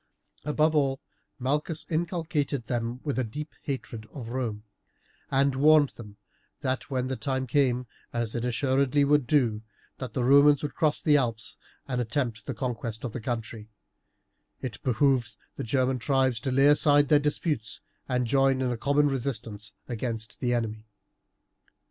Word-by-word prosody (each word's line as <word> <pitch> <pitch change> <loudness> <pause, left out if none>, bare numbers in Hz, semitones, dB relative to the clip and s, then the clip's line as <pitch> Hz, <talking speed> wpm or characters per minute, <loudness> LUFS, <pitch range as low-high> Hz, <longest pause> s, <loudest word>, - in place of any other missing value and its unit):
Above 155 +1 +2
all, 135 -2 +2 0.4
Malchus 150 +4 -1
inculcated 155 -6 -1
them 120 +1 -2
with 145 -3 -1
a - - +2
deep 150 +7 -6
hatred 115 -5 -5
of 120 -5 -7
Rome, 115 -4 -3 0.7
and 135 0 +3
warned 150 +1 +5
them 105 -3 -12 0.4
that 130 0 -2
when 130 -2 -1
the 130 0 -2
time 130 -1 -2
came, 125 -2 +1 0.3
as 120 -2 -2
it 120 - -2
assuredly 135 +3 +2
would 145 -3 +3
do, 120 -7 +2 0.4
that 130 - -6
the 125 - 0
Romans 140 +3 +6
would 150 - -3
cross 155 -3 +1
the 150 -1 +5
Alps 115 -5 -2 0.3
and 125 -2 -1
attempt 115 -2 -2
the 135 - -3
conquest 115 -2 -4
of 120 - -3
the 120 - -6
country, 115 -2 -4 0.9
it 125 -3 -6
behooved 130 -1 +1 0.2
the - - -4
German 130 +2 +1
tribes 130 -2 +1
to 130 - -2
lay 135 +2 +4
aside 145 0 +5
all - - -13
their 150 - +6
disputes 145 - -2 0.3
and 125 -1 +1
to 115 - -4
join 135 -1 +3
in 125 - 0
a 120 - -2
common 145 +4 +2
resistance 115 -6 -3
against 115 -2 -4
the 125 - 0
enemy. 110 -2 -2
130 Hz, 160 wpm, -27 LUFS, 115-145 Hz, 0.9 s, Romans